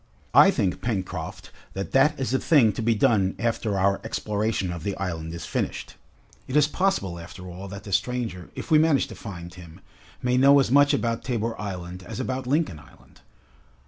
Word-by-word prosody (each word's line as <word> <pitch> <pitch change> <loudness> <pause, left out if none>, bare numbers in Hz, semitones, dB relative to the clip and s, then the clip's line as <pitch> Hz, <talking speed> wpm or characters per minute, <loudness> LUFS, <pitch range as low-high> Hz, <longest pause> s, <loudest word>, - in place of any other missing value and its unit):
"I - - +8
think, 90 -1 0
Pencroft, 95 -4 -4 0.2
that 95 0 -5
that 135 +3 +3
is 130 -2 -1
a 130 - +2
thing 125 -10 +4
to - - -4
be 115 0 +2
done 105 -5 +2
after 110 -3 -1
our 95 +1 +2
exploration 105 -3 -2
of 85 - -6
the 100 0 -3
island 80 -4 -4
is 80 -2 -6
finished. - - -3 0.5
It 130 - -4
is 150 -1 +5
possible 150 - -1
after 85 +2 -10
all 90 +2 -8
that 100 0 -8
the 100 - -6
stranger, 110 -3 -2
if - - -7
we 155 - +7
manage 155 -3 +3
to 110 - -9
find 85 -4 -8
him, 90 -1 -13 0.4
may 125 0 +2
know 140 +2 +7
as 135 - +1
much 145 +1 +5
about 115 0 -1
Tabor 115 -2 -2
Island 90 -3 -6
as 90 - -8
about 130 0 -3
Lincoln 145 - 0
Island. 70 - -20
105 Hz, 190 wpm, -25 LUFS, 95-130 Hz, 0.5 s, I